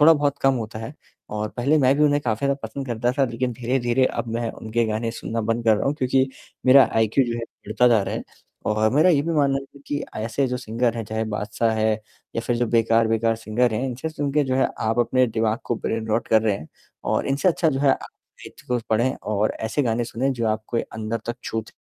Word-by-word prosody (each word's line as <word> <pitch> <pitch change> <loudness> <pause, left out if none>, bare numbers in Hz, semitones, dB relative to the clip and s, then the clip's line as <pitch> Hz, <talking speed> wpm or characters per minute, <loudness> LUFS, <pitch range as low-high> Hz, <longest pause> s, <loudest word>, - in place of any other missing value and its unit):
थोड़ा 160 +2 +8
बहुत 145 -2 0
कम 135 0 +4
होता 110 -2 -4
है 115 +7 -7 0.4
और 105 0 -2
पहले 140 +6 +2
मैं 135 -1 +4
भी 150 - +2
उन्हें 145 0 +3
काफ़ी 115 +2 0
ज़्यादा 140 - +2
पसंद 135 +5 -5
करता 120 0 0
था 135 - +5
लेकिन 125 +1 -2
धीरे-धीरे 120 +1 +1
अब - - -3
मैं 115 -1 -1
उनके 115 +1 -2
गाने 110 +1 -1
सुनना 115 0 -4
बंद 115 +2 -1
कर 110 -2 +5
रहा - - -1
हूँ 140 - +1
क्योंकि 130 -1 +1 0.4
मेरा 135 +1 +8
आईक्यू 115 +4 +3
जो 120 -1 -2
है - - -4 0.2
गिरता 110 +4 +3
जा 115 -3 +4
रहा - - -3
है - - -3 0.4
और 110 +1 +2
मेरा 155 +5 +5
ये 145 -4 +3
भी 165 +2 -2
मानना 140 -3 +2 0.2
है - - -14
कि 145 0 -2
ऐसे 115 +5 -1
जो 125 - -2
सिंगर 120 0 -1
हैं 115 - -3
चाहे 110 +1 -2
बादशाह 110 +2 0
है 110 0 +2 0.4
या 115 - +1
फिर 120 - +1
जो 120 - +1
बेकार-बेकार 115 0 +2
सिंगर 115 +2 0
हैं 125 - -1
इनसे 130 +4 -4
सुनके 145 -1 0
जो 130 -1 -1
है 130 - +3
आप 110 +1 0
अपने 125 +2 +3
दिमाग 110 0 0
को 120 - -1
ब्रेन 115 0 -2
रॉट 110 +2 0
कर 110 -1 +4
रहे 110 -3 +2
हैं 75 - -11 0.4
और - - 0
इनसे 140 +7 +2
अच्छा 165 -1 +2
जो 135 -2 -1
है 140 -1 +4
अ - - -4 0.3
साहित्य - - -13
को 125 -1 0
पढ़ें 120 +4 +2
और 105 0 0
ऐसे 110 +6 0
गाने 120 -1 0
सुनें 130 +4 -1
जो 115 -3 -2
आपको 110 +2 -2
अंदर 110 +1 -3
तक 120 - -3
छूते 110 -1 -4
120 Hz, 235 wpm, -23 LUFS, 110-135 Hz, 0.4 s, थोड़ा